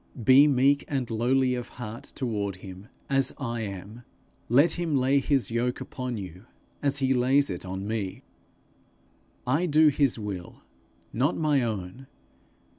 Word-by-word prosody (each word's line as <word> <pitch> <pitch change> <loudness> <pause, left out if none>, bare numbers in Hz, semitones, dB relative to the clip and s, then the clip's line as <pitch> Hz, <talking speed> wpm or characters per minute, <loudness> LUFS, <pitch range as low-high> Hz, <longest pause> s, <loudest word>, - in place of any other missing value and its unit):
Be 135 +5 +7
meek 140 +1 +3
and 130 -5 -2
lowly 125 +3 +2
of 125 -1 -4
heart 115 -1 -7
toward 105 -7 -2
him 95 +2 -10 0.2
as 135 -1 +1
I 120 -4 -3
am; 100 +2 -7 0.5
let 140 +8 +5
him 170 -4 -1
lay 135 +1 +3
his 135 -3 0
yoke 120 +2 -1
upon 125 -2 -5
you 95 +2 -9 0.3
as 140 -1 +1
he 135 -1 +2
lays 130 0 +2
it 90 +1 -6
on 95 +2 -5
me. 105 -4 -4 1.2
I 145 +8 +1
do 155 0 +5
his 140 -3 +1
will, 100 -5 -7 0.5
not 135 +8 +1
my 150 -4 +2
own. 110 +2 -4
125 Hz, 145 wpm, -27 LUFS, 105-140 Hz, 1.2 s, Be